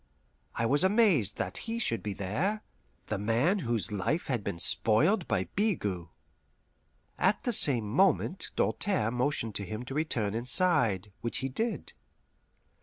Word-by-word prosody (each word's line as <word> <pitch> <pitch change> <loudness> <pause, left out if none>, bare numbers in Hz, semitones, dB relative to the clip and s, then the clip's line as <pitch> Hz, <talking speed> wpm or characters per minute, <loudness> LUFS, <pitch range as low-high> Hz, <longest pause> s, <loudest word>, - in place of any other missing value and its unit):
I 115 - 0
was 145 +8 +2
amazed 190 - +3
that - - -3
he 230 - -2
should 115 - 0
be 105 - -4
there 155 - -2 0.4
the 105 - -3
man 120 - +1
whose 115 - -2
life 105 - -1
had 120 -6 -2
been 85 - -4
spoiled 115 - +3
by - - 0
Bigot. 105 - -1 1.1
At 205 - +2
the 245 - -1
same 125 - +3
moment 190 - +1
Doltaire 115 - 0
motioned 125 -3 -1
to 100 - -5
him 110 +4 -6
to 135 - -7
return 125 -9 -1
inside; 120 - +2
which 120 - -2
he - - -1
did. 225 - -3
125 Hz, 145 wpm, -29 LUFS, -, 1.1 s, amazed